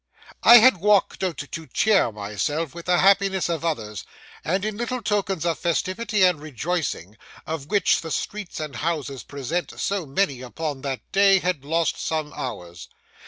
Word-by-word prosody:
I 240 - +10
had 240 -2 +6
walked 205 +1 +2
out 175 -6 -1
to 160 +2 -7
cheer 215 - +2
myself 105 - -3
with 170 0 -10
the 180 0 +3
happiness 195 -1 +3
of 165 -2 -2
others, 110 -11 -3 0.4
and, 185 +7 -1
in 215 -1 -2
the - - -10
little 245 0 -3
tokens 195 -6 -1
of 170 -1 0
festivity 195 +4 0
and 180 -5 +3
rejoicing, 150 - -3 0.3
of 155 -3 -5
which 200 0 +2
the 165 - -7
streets 205 +4 -4
and 150 -6 -5
houses 145 -3 -3
present 145 +5 -4
so 195 -5 -2
many 135 -3 0
upon 140 +2 -5
that 135 -2 -4
day, 195 0 +5
had 180 -6 -1
lost 165 +3 0
some 155 -2 -2
hours. 90 -9 -7
165 Hz, 165 wpm, -24 LUFS, 140-195 Hz, 0.4 s, I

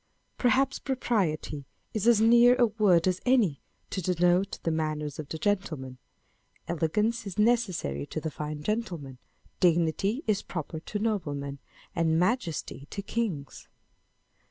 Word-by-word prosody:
Perhaps 265 +2 +2
propriety 180 - -1 0.3
is 215 0 -1
as 235 -3 +6
near 235 +2 +6
a 250 -1 +5
word 205 -6 +3
as 185 0 0
any 230 - +3 0.3
to 190 - -2
denote 180 +2 +2
the 165 - +1
manners 155 -2 -2
of 150 -2 -6
the 160 - -4
gentleman; 155 -10 -2 0.7
elegance 210 +8 0
is 195 - -7
necessary 205 - +1
to - - -4
the 160 0 -4
fine 150 0 -5
gentleman; 170 - -3 0.4
dignity 180 - +2
is 210 -2 +1
proper 160 -2 -5
to 210 - -5
noblemen; 145 -10 -2 0.4
and 160 -1 +2
majesty 175 - -1
to 200 - -5
kings 190 - -3
180 Hz, 130 wpm, -28 LUFS, 155-220 Hz, 0.7 s, as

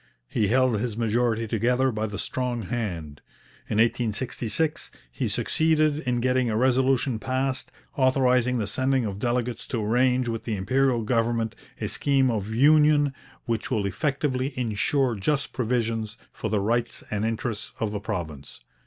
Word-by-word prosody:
He 105 - 0
held 125 -1 +3
his 115 -1 -3
majority 115 0 +1
together 125 +4 +2
by 110 -1 -2
the 105 -1 -6
strong 125 +1 -2
hand. 90 -9 -4 0.5
In 105 - -1
1866 115 +5 0 0.2
he - - -2
succeeded 155 -2 +2
in 125 -5 -1
getting 125 -1 +2
a 110 - 0
resolution 130 -1 +2
passed, 130 +2 -2 0.2
authorizing 125 -2 +3
the 110 - -1
sending 130 +4 0
of 100 -2 -4
'delegates 120 0 -1
to 115 -5 -2
arrange 125 +3 +2
with 115 -1 -3
the 110 - -2
Imperial 120 +4 +1
government 115 0 0 0.3
a - - -2
scheme 135 -3 +2
of 110 -1 -3
union 145 +3 +5 0.3
which 115 +3 -2
will 110 -6 0
effectively 135 +5 -1
ensure 125 +3 +1
just 135 +8 -1
provisions 115 -3 -1
for 110 - -4
the 105 0 +1
rights 115 +4 -1
and 105 0 -1
interests 110 -1 -3
of 110 -2 -1
the 105 - -3
province.' 85 -10 -5
120 Hz, 150 wpm, -25 LUFS, 110-130 Hz, 0.5 s, union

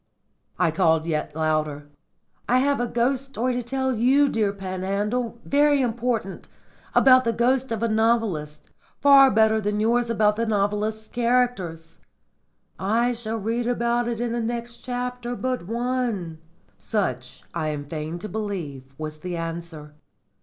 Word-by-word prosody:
I 180 -3 +2
called 160 -1 +2
yet 150 -2 -2
louder, 155 -2 -1 0.6
"I 250 - +4
have 280 +1 +2
a 245 - 0
ghost 255 +3 0
story 255 -2 -1
to 245 - -1
tell 265 +2 -1
you, 265 +6 +4
dear 215 -5 +1
Panhandle. 200 +5 -2
Very 290 0 +3
important. 235 -5 -2 0.5
About 255 -1 +7
the 230 - +1
ghost 250 +3 +1
of 225 0 -2
a - - +3
novelist. 215 -9 0 0.3
Far 275 -1 +7
better 220 0 +3
than 210 0 -1
yours 235 +2 +2
about 210 -2 +2
the 230 0 0
novelist's 210 +1 -1
characters!" 235 -10 -1 0.8
"I 230 +5 +1
shall 225 -1 -4
read 230 +3 -2
about 240 0 +1
that 235 -1 -3
in 240 -1 -1
the 235 0 -1
next 235 +1 -4
chapter 245 -1 -4
but 250 -7 -3
one." 230 -8 -2 0.4
Such, 130 - -3
I 160 -2 -2
am 150 -2 -3
fain 155 +2 -5
to 180 - -7
believe, 160 -12 -5
was 155 0 -6
the 175 +1 -4
answer. 165 -2 -6
225 Hz, 145 wpm, -24 LUFS, 175-245 Hz, 0.8 s, About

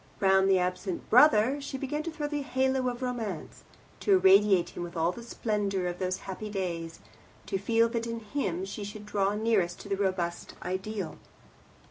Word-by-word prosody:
Round 190 0 +4
the 190 - +5
absent 180 0 -2
brother 255 +1 +6
she 275 -1 -5
began 280 +3 -2
to 335 - -4
throw 310 -2 -4
the 290 0 -2
halo 265 -1 +1
of 245 +1 -5
Romance, 225 -9 -4 0.4
to 405 - +3
irradiate 195 - +5
him - - -8
with 175 0 -6
all 165 +2 +2
the 235 - -9
splendour 205 -5 -2
of 175 0 -3
those 185 0 -2
happy 205 +3 -5
days, 170 -5 -4 0.5
to 195 - -2
feel 230 +3 +3
that 230 0 -2
in 230 0 -3
him 200 -6 -2
she 200 +2 -6
should 210 +1 -8
draw 200 -1 0
nearest 210 -5 +1
to 205 - -10
the 200 - +1
robust 185 -3 -2
ideal. 190 0 -4
205 Hz, 180 wpm, -29 LUFS, 185-235 Hz, 0.5 s, brother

